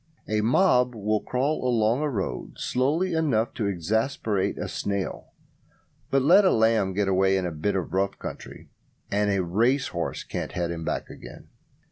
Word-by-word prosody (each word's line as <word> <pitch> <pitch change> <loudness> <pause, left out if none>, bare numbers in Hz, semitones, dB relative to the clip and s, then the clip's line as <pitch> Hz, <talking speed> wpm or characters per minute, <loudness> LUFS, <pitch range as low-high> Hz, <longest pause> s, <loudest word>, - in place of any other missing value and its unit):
A 110 0 0
mob 125 - +3
will 105 0 0
crawl 135 +7 -1
along 120 0 +2
a 150 - 0
road 100 -8 -4
slowly 155 +9 0
enough 135 -9 +1
to 105 - -2
exasperate 105 - -1
a - - -3
snail, 100 -2 -3 0.8
but 135 -1 +2
let 185 +8 +6
a 190 - +5
lamb 110 - +2
get 100 +1 0
away 95 0 +3
in 95 - -1
a 90 - -2
bit 80 +7 -2
of 90 -2 -3
rough 95 +1 0
country, - - -9 0.4
and 105 0 +1
a 100 -2 +1
racehorse 105 -1 0
can't - - -5
head 85 -1 -2
him 85 -1 -5
back - - -3
again. - - -12
110 Hz, 165 wpm, -25 LUFS, 95-130 Hz, 0.8 s, let